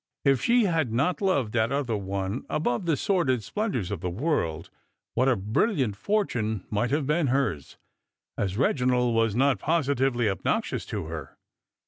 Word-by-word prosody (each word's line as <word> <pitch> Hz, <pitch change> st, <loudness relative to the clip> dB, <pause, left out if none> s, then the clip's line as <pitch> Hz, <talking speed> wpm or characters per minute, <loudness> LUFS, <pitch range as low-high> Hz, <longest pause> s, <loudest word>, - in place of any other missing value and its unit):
If 135 Hz, -3 st, +4 dB
she 240 Hz, -, +4 dB
had 165 Hz, -, +1 dB
not 140 Hz, -, 0 dB
loved 140 Hz, -, +1 dB
that 115 Hz, 0 st, +1 dB
other 135 Hz, -5 st, 0 dB
one 100 Hz, +2 st, -3 dB
above 150 Hz, +1 st, -1 dB
the 160 Hz, -4 st, +2 dB
sordid 135 Hz, -, +1 dB
splendours 180 Hz, -, -2 dB
of 100 Hz, -5 st, -4 dB
the 90 Hz, -, -2 dB
world, 90 Hz, -, -2 dB, 0.4 s
what 130 Hz, +3 st, +2 dB
a 130 Hz, -, +3 dB
brilliant 110 Hz, -, 0 dB
fortune 110 Hz, -, -1 dB
might 110 Hz, +3 st, 0 dB
have 145 Hz, 0 st, 0 dB
been 150 Hz, +2 st, +1 dB
hers! 120 Hz, -, -1 dB, 0.6 s
And 100 Hz, -, -1 dB
Eeginald 125 Hz, +2 st, +1 dB
was 115 Hz, -2 st, +2 dB
not 130 Hz, -3 st, +3 dB
positively 135 Hz, -7 st, +1 dB
obnoxious 95 Hz, -, -1 dB
to -, -, -4 dB
her. 80 Hz, -4 st, -7 dB
125 Hz, 155 wpm, -26 LUFS, 105-145 Hz, 0.6 s, If